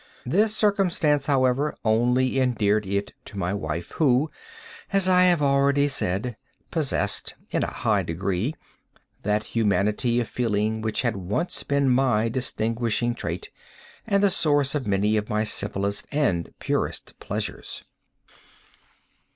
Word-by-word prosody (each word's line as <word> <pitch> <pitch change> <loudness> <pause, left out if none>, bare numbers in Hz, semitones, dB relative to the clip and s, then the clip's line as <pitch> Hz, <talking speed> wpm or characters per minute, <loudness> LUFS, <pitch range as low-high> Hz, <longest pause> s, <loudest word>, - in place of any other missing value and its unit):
This 210 - +2
circumstance, 175 -9 +2
however, 135 +1 +2
only 125 +4 +2
endeared 110 -5 +1
it 100 +1 -2
to 100 - -8
my 90 0 -1
wife, 85 -3 -4
who, 145 0 +3 0.6
as 195 -2 +3
I 180 0 +5
have 175 -4 +3
already 140 +1 +3
said, 110 -2 -2 0.3
possessed, - - 0 0.2
in - - 0
a - - -1
high - - 0
degree, 95 - -2 0.7
that 105 +1 0
humanity 105 +2 +1
of 120 - -1
feeling 110 -2 -1
which 110 +2 -1
had 120 -4 0
once 105 - -2
been 140 -1 +1
my 125 -4 +3
distinguishing 120 -1 -1
trait, 85 -6 -5 0.6
and 200 0 +2
the 200 - +5
source 145 -5 +2
of 145 -6 -2
many 105 +2 +2
of 105 0 -2
my 105 0 +1
simplest 100 -1 -1
and 110 - 0
purest - - -3
pleasures. - - -5
120 Hz, 130 wpm, -25 LUFS, 105-140 Hz, 0.7 s, I